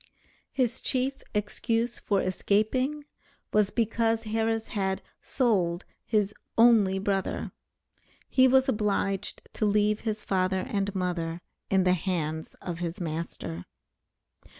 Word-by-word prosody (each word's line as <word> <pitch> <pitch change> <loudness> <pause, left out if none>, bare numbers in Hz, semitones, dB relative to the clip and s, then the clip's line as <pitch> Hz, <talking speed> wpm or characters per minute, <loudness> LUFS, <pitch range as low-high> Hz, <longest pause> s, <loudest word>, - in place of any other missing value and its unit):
His 255 -2 0
chief 265 +1 -1
excuse 225 +3 -1
for 200 -2 +1
escaping, 255 +10 0 0.5
was 210 -2 +4
because 225 0 +1
Harris 225 0 -1
had 190 -3 -1 0.2
"sold" 190 -8 +1 0.2
his 210 -2 +1 0.2
"only 225 -5 +6
brother." 195 0 -1 0.8
He 260 -1 +5
was 265 +1 +4
obliged 205 -4 -1
to 215 - 0
leave 210 +1 +2
his 215 -2 -3
father 185 0 +1
and 200 -1 -1
mother 175 -3 -2 0.3
in 190 -1 +3
the 180 0 +4
hands 160 -3 -2
of 170 -2 -4
his 175 +2 -3
master. 155 - -4
205 Hz, 115 wpm, -28 LUFS, 185-225 Hz, 0.8 s, only